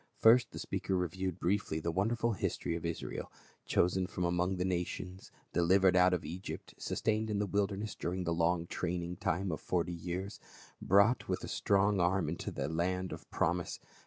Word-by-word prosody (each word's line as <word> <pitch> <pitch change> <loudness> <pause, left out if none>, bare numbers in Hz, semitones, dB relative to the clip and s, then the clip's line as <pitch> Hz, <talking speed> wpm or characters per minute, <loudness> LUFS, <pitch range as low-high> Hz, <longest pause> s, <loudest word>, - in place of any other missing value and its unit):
First 120 +2 +6
the - - -9
speaker 95 - -2
re 90 0 +1
viewed 95 0 -3
briefly 85 -3 0
the 85 +1 -1
wonderful 115 +6 +1
history 85 -3 -2
of 85 - -5
Israel, 85 - -5 0.4
chosen 90 +1 +2
from 90 -2 -3
among 90 +2 +1
the 90 - 0
nations, 90 +1 -3 0.2
delivered 95 +2 +4
out 90 0 +6
of 90 -3 -1
Egypt, 90 +5 -6
sustained 110 0 0
in 105 - 0
the 105 - +1
wilderness 100 +1 -1
during 90 +2 -3
the 85 -1 0
long 85 +1 +1
training 90 0 -3
time 90 +1 -1
of 80 - -4
forty 90 -1 -1
years; 90 +4 -4 0.4
brought 100 +6 +4
with - - -1
a - - -4
strong 100 0 +2
arm 90 -1 +2
into 85 - -4
the 70 -1 -3
land 90 +3 -1
of - - -8
promise. 85 +1 0
90 Hz, 180 wpm, -33 LUFS, 85-95 Hz, 0.4 s, First